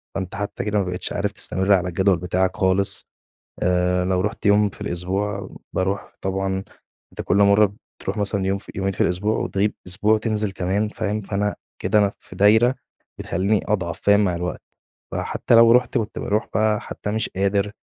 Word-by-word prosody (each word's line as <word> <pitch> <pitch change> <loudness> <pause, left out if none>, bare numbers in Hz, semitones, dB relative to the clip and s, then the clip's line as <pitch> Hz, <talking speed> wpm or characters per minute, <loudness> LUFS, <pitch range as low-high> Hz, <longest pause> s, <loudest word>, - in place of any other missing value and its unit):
فأنت 95 -2 -4
حتى 100 +1 -4
كده 105 0 +1
ما - - +1
بقيتش 90 0 -3
عارف 100 0 -1
تستمر 95 0 +2
على 90 -2 +2
الجدول 95 +1 +2
بتاعك 90 +1 0
خالص، 95 +1 +1 0.6
آآ، 90 0 +2
لو 90 0 +1
رُحت 105 +2 -4
يوم 105 0 +4
في - - -16
الأسبوع، 100 +3 -2 0.2
باروح 95 +1 -2
طبعًا، 95 0 -2 0.5
أنت - - -5
كل - - +1
مرة 100 0 +5 0.3
بتروح - - -4
مثلًا 100 -1 0
يوم 95 +1 +1
ف 100 - -14
يومين 95 0 -1
في - - -3
الأسبوع 100 +5 +1
وتغيب 100 +2 0
أسبوع 105 +4 +2
وتنزل 110 -2 0
كمان 95 +3 -1
فاهم، 105 0 -3
فأنا 100 +1 -2 0.3
كده 105 - +3
أنا 100 -1 +3
في - - -13
دايرة 110 +5 +4 0.4
بتخلّيني 100 +2 0
أضعف 95 -5 -1
فاهم، 100 0 +4
مع 90 -2 0
الوقت. 90 +1 -4 0.5
فحتى - - +1
لو 115 0 +7
رُحت 125 +2 +3
وبت 110 -2 -3
روح 105 +2 -1
بقى 110 -1 +2
حتى 105 - -5
مش 110 0 -1
قادر، 100 +1 0
100 Hz, 180 wpm, -22 LUFS, 95-105 Hz, 0.6 s, لو